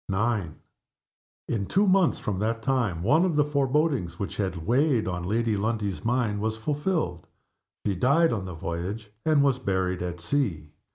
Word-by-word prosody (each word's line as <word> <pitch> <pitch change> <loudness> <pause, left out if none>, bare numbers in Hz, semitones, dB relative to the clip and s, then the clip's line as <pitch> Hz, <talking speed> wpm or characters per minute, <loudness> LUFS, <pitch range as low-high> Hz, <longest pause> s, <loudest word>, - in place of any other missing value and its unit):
IX. 100 -4 0 0.9
In 100 -4 -2
two 200 +2 +3
months 185 -3 +4
from 100 -3 -3
that 115 +2 -1
time 115 -11 0
one 155 - +4
of 180 -4 +1
the 150 -1 +4
forebodings 140 - 0
which 100 - -4
had 95 -5 -2
weighed 125 -1 +2
on 90 -1 -2
Lady 110 +3 +1
Lundie's 105 -4 -2
mind 115 -3 0
was 110 0 -1
fulfilled. 145 - -2 0.6
She 100 - +1
died 140 - +3
on 100 -5 -3
the 90 -2 -6
voyage, 90 +7 -5 0.2
and 150 -3 +5
was 135 -2 +2
buried 95 -5 -1
at 90 -1 -4
sea. 85 - -1
110 Hz, 165 wpm, -26 LUFS, 95-140 Hz, 0.9 s, and